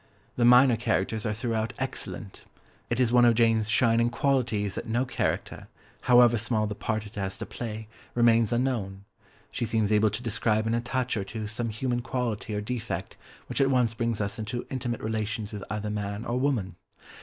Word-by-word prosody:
The 120 - +2
minor 125 0 +7
characters 110 -1 -1
are 105 - 0
throughout 115 -1 -2
excellent; - - -5 0.4
it 120 - -1
is 125 -2 +2
one 120 0 +6
of 120 -1 +5
Jane's 115 -2 +3
shining 115 0 +3
qualities 120 -6 0
that - - -5
no 120 +3 +1
character, 130 - -2 0.3
however 120 -2 +5
small 110 -1 +1
the 105 - -3
part 110 +1 -3
it 105 - -12
has 95 -2 -4
to - - -5
play, 110 -2 -6 0.3
remains 115 -1 +4
unknown, 115 -6 -1 0.5
she - - -3
seems 110 -2 +1
able 105 0 +4
to 110 +4 -5
describe 110 -1 0
in 110 - 0
a 115 - +1
touch 125 0 -1
or 100 - -1
two 110 +2 -6
some 110 +2 -3
human 120 +2 -2
quality 120 -3 -3
or 105 - -1
defect 115 +1 -4 0.3
which - - -1
at 135 - +4
once 125 -4 +2
brings 115 -1 -1
us 100 +1 -2
into 110 +3 -4
intimate 120 -3 -3
relations 110 -1 -3
with 105 - -5
either 105 0 -3
man 105 +1 -4
or 120 +1 -1
woman. 115 - -1
115 Hz, 190 wpm, -27 LUFS, 105-120 Hz, 0.5 s, minor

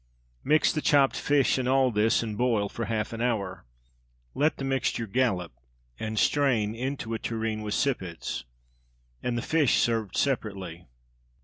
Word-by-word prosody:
Mix 150 +2 +3
the 155 - -1
chopped 140 -3 +4
fish 140 -2 +2
in 125 - -1
all 130 -1 +3
this, 110 +2 +2
and 110 -2 -4
boil 110 -3 +1
for 115 - -4
half 110 +1 -2
an 115 - -4
hour. 100 - -2 0.7
Let 150 +3 +1
the - - -5
mixture 135 -3 0
"gallop" 95 -7 0 0.5
and 110 0 -4
strain 120 -6 +2
into 125 -1 -4
a 110 - -2
tureen 110 -1 -2
with 105 -1 -2
sippets, 90 - -2 0.8
and 120 -1 -1
the 120 - -2
fish 155 -5 +3
served 115 -4 0
separately. 100 - -2
115 Hz, 150 wpm, -27 LUFS, 105-135 Hz, 0.8 s, chopped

